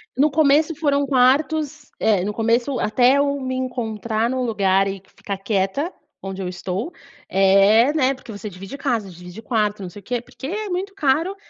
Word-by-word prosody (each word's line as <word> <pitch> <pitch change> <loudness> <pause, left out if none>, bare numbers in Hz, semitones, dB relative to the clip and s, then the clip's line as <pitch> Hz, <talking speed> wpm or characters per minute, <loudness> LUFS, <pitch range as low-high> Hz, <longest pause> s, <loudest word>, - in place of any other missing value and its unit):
No 285 +4 +3
começo 305 +2 +3
foram 285 -2 +1
quartos 285 +3 +1
eh, 205 -5 +2
no 210 +2 -2
começo 235 +4 0
até 250 +5 +3
eu 280 0 +1
me 260 0 -3
encontrar 230 -3 -2
em 260 - -2
um 255 - -1
lugar 195 -4 +2
e 195 -1 -5
ficar 200 -1 -5
quieta 200 - -1 0.3
onde 195 0 -6
eu 185 - -3
estou, 185 - -4 0.3
eh, 195 +6 +5
né, 270 -3 +2
porque 260 -3 -12
você 205 0 -7
divide 195 +7 -9
casa, 240 -8 -1
divide 180 +3 -11
quarto, 210 -3 -1
não 185 - -6
sei 180 - -11
o - - -32
quê, 245 +3 -2
porque 265 +2 -9
é 420 +5 -4
muito 380 +2 -3
caro 325 +2 +1
240 Hz, 190 wpm, -21 LUFS, 200-280 Hz, 0.3 s, eh